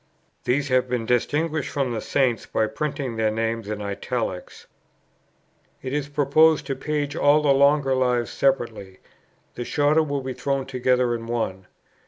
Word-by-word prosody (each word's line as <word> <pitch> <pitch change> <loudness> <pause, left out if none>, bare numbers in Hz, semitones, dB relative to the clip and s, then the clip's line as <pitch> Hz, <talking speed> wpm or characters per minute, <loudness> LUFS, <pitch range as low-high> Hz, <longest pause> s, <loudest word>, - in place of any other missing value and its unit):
These 140 +3 0
have 130 0 +2
been 120 -2 -1
distinguished 150 +6 0
from 135 -4 -1
the 110 - -3
Saints 130 -5 0
by 110 - +1
printing 140 -1 -4
their 110 -1 +2
names 115 0 -2
in 105 -1 -4
italics. 100 -1 -4 1.2
It 130 0 -4
is 145 -1 -2
proposed 150 +1 +3
to 135 -1 -3
page 145 +1 -2
all 150 -1 +4
the 140 -2 +4
longer 140 0 +3
Lives 125 -2 +1
separately; 115 -8 -1 0.6
the 120 - -5
shorter 145 +5 +2
will 145 -3 -2
be 130 0 -4
thrown 135 +2 -2
together 125 -1 +1
in 115 -1 -5
one. 95 -6 -3
130 Hz, 155 wpm, -24 LUFS, 115-145 Hz, 1.2 s, all